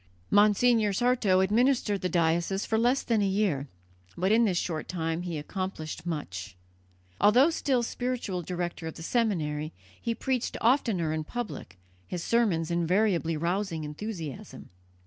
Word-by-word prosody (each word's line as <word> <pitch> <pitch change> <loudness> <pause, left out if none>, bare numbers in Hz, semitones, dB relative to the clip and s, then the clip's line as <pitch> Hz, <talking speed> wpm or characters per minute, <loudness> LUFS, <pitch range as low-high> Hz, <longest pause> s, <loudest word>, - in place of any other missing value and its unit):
Monsignor 210 +1 +4
Sarto 220 -4 +3
administered 215 0 +2
the 185 - -1
diocese 170 +3 +1
for 220 - +1
less 245 +4 +2
than 225 -3 +1
a 200 - +2
year, 190 -8 0 0.5
but 185 +3 +1
in 230 +1 +5
this 185 -5 +1
short 160 -3 -2
time 165 -1 -2
he 175 -3 -4
accomplished 165 0 -5
much. 95 - -5 0.6
Although 250 +10 +5
still 265 -6 +1
spiritual 240 -7 -3
director 175 -1 -4
of 160 - -6
the 160 - -9
seminary, 160 -9 -1 0.3
he 230 - -1
preached 255 -1 -2
oftener 220 - +2
in 155 0 -2
public, 210 - -6 0.3
his 175 -2 -4
sermons 190 -9 +1
invariably 170 -1 +1
rousing 170 0 -1
enthusiasm. 155 - -7
190 Hz, 140 wpm, -28 LUFS, 165-225 Hz, 0.6 s, in